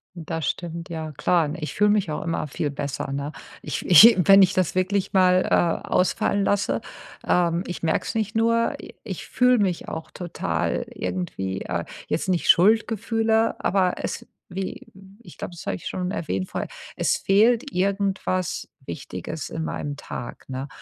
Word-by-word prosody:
Das 165 -1 -4
stimmt, 170 0 -5
ja, 160 -2 -5
klar, 160 +1 +1
ich 155 -2 -5
fühle 210 0 +4
mich 205 -5 +1
auch 150 - -3
immer 165 -1 -2
viel 145 +1 -3
besser, 140 -1 -4
ne? 140 +2 -3 0.3
Ich - - -4
ich 195 +7 +9
wenn 195 0 +9
ich 190 0 +5
das 185 -3 +1
wirklich 185 +1 0
mal, 185 -1 +4
äh, 170 -1 +1
ausfallen 200 +2 +1
lasse, 200 0 +1 0.5
ähm, 175 0 +2
ich 175 - -6
merke 160 - +1
es - - -4
nicht 215 -1 -1
nur, 230 +1 +2
i - - -12
ich - - -6
fühle 250 -1 +3
mich 185 -4 0
auch 160 - -6
total 175 -2 -2
irgendwie 95 +1 -4
äh, 85 -1 -3 0.2
jetzt 165 - -1
nicht 180 -2 0
Schuldgefühle, 225 +3 +3
aber 185 -2 +2
es - - -4 0.2
wie 190 +1 -5 0.3
ich 175 -7 -14
glaube, - - -6
das 170 - -9
habe - - 0
ich - - -11
schon 180 -1 -3
erwähnt 95 - -3
vorher, - - -3 0.3
es - - +1
fehlt 230 +7 +3
irgendwas 190 -2 -1 0.2
Wichtiges - - -6
in 80 - -4
meinem 75 -2 -4
Tag, - - -8
ne? 130 +1 -4
180 Hz, 165 wpm, -24 LUFS, 155-200 Hz, 0.5 s, ich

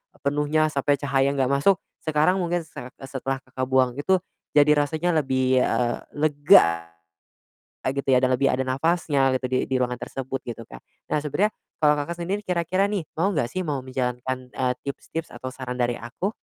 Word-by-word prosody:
e - - -20
penuhnya 150 +2 +1
sampai 140 0 +1
cahaya 140 0 +2
nggak 135 -2 +1
masuk, 160 +8 +3 0.2
sekarang 155 +4 +3
mungkin 175 -1 0
se 160 -1 -16
eee, 130 +1 -11
setelah 135 0 -3
Kakak 130 0 -4
buang 130 -1 +2
itu 185 +5 +2 0.3
jadi 150 0 +5
rasanya 155 +4 0 0.2
lebih, 130 -1 +2
eee, 120 -2 +1 0.2
lega 145 - +4 1.0
gitu 140 +1 -2
ya 125 - +5
dan 130 - +3
lebih 140 - +1
ada 130 - 0
napasnya 135 0 +1
gitu 130 0 -1
di 130 0 +1
di 130 - -2
ruangan 125 0 -1
tersebut 135 +2 -4
gitu, 115 -2 -6
Kak. - - -9 0.3
Nah, - - +1
sebenarnya 150 +8 +1 0.3
kalau 150 -1 +5
Kakak 145 +4 -2
sendiri 195 +4 -2
kira-kira 180 +2 +1
nih 205 -2 -1 0.2
mau 195 +5 +2
nggak 140 -8 0
sih, 185 -1 -3
mau 145 -4 -2
menjalankan, 130 0 -3
eee, 130 -1 0
tips-tips, 160 +3 -5
atau 125 +2 -6
saran 125 -1 -5
dari 120 0 0
aku? 120 - -4
140 Hz, 185 wpm, -24 LUFS, 130-155 Hz, 1.0 s, jadi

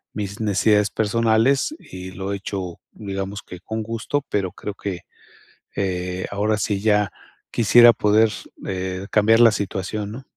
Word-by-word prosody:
mis 100 0 -4
necesidades 105 0 +2
personales 115 - +2
y 95 0 -9
lo 95 +2 -5
he 100 - -2
hecho, 95 -3 -5
digamos 100 0 -5
que 90 - -10
con 110 +3 -4
gusto, 115 +6 -2
pero 95 -3 -1
creo 105 - -6
que, 95 -4 -5 0.7
eh, 90 -1 -2
ahora, 105 +1 0
sí 100 0 -1
ya 105 -2 +2 0.4
quisiera 120 +1 +7
poder, 110 +1 +3 0.4
eh, 95 0 -4
cambiar 110 +2 +4
la 115 -2 +8
situación, 100 +1 -3
¿no? 125 +4 -8
105 Hz, 145 wpm, -22 LUFS, 95-110 Hz, 0.7 s, la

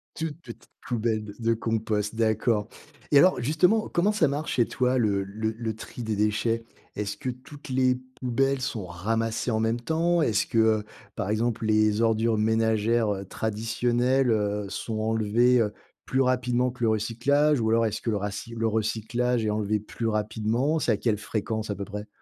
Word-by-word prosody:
Toute 160 -1 -4
petite 120 -5 -12 0.2
poubelle 110 -2 -1
de 105 - -9
de 115 0 +2
compost. 110 -1 -1
D'accord 110 -1 +1 0.4
et 145 - +6
alors, 185 -3 +5
justement, 180 - +2
comment 190 +5 +2
ça 185 -8 +2
marche 145 +2 -2
chez 120 -2 +3
toi 130 0 +1
le 100 -4 +1
le 110 +3 -3
le 110 -1 -4
tri 120 +1 -8
des 110 -1 -2
déchets? 110 +2 0 0.3
Est-ce 105 0 -3
que 130 - -4
toutes 130 +3 -10
les 130 -1 +3 0.2
poubelles 135 +2 +1
sont 115 -6 -3
ramassées 110 +7 -1
en 110 - +1
même 115 +2 0
temps? 165 +5 +1
Est-ce 110 - +1
que, 115 - -2
heu, 110 -1 +4 0.3
par 95 - -3
exemple, 115 +1 0
les 110 0 +3
ordures 115 0 +2
ménagères, 110 0 +2
heu, 100 0 -6
traditionnelles, 120 +5 0
heu, 105 -1 0
sont 110 +1 -4
enlevées, 115 +3 +3
heu, 105 -2 0 0.3
plus 135 0 +1
rapidement 125 -1 +1
que 125 -1 -7
le 110 - +4
recyclage? 125 +6 +2
Ou 110 - +1
alors 115 0 +3
est-ce 110 +1 -2
que 115 - -2
le 105 - +1
raci 105 +3 -5
le 115 0 +1
recyclage 110 +2 0
est - - +1
enlevé 105 0 0
plus 115 +2 -5
rapidement? 110 +7 0
C'est 120 - +1
à 105 - +2
quelle 110 -4 0
fréquence 110 +1 -3
à 100 - -1
peu 100 +1 -5
près? 105 +1 -7
115 Hz, 185 wpm, -26 LUFS, 110-125 Hz, 0.4 s, et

